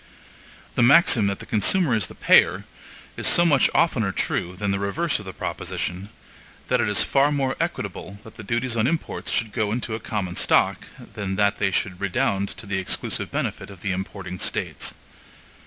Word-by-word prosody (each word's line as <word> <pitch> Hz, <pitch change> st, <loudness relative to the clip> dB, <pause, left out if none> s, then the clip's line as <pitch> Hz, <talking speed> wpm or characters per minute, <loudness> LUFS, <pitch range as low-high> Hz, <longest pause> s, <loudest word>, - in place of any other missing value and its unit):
The -, -, 0 dB
maxim 120 Hz, -5 st, +5 dB
that 100 Hz, -, -1 dB
the -, -, -10 dB
consumer 140 Hz, -, +3 dB
is 110 Hz, -4 st, +1 dB
the -, -, -13 dB
payer, -, -, +4 dB, 0.5 s
is -, -, 0 dB
so 170 Hz, -, +6 dB
much 145 Hz, -6 st, +4 dB
oftener 115 Hz, -12 st, +2 dB
true 90 Hz, -1 st, -2 dB
than 100 Hz, +1 st, -2 dB
the 100 Hz, -, -1 dB
reverse 145 Hz, +11 st, -1 dB
of 100 Hz, -, -10 dB
the 95 Hz, -, -6 dB
proposition, 90 Hz, +1 st, -4 dB, 0.6 s
that -, -, +2 dB
it -, -, 0 dB
is 105 Hz, -, +4 dB
far 140 Hz, +1 st, +2 dB
more 135 Hz, -2 st, 0 dB
equitable 100 Hz, +2 st, -4 dB
that 110 Hz, -, -13 dB
the -, -, -10 dB
duties 120 Hz, +3 st, -1 dB
on 115 Hz, +1 st, +2 dB
imports 165 Hz, +2 st, -3 dB
should 110 Hz, -1 st, -1 dB
go 105 Hz, -3 st, -1 dB
into 115 Hz, 0 st, -3 dB
a 110 Hz, -, -3 dB
common 100 Hz, -5 st, -4 dB
stock, -, -, +2 dB, 0.3 s
than 100 Hz, -2 st, -4 dB
that 100 Hz, +1 st, +1 dB
they 100 Hz, -, +2 dB
should 90 Hz, -1 st, -2 dB
redound 100 Hz, +1 st, 0 dB
to -, -, -9 dB
the 100 Hz, -1 st, -2 dB
exclusive 95 Hz, -, -2 dB
benefit -, -, -3 dB
of 95 Hz, -3 st, -13 dB
the 95 Hz, -, -2 dB
importing 95 Hz, -1 st, -5 dB
States. -, -, -2 dB
105 Hz, 190 wpm, -23 LUFS, 95-120 Hz, 0.6 s, so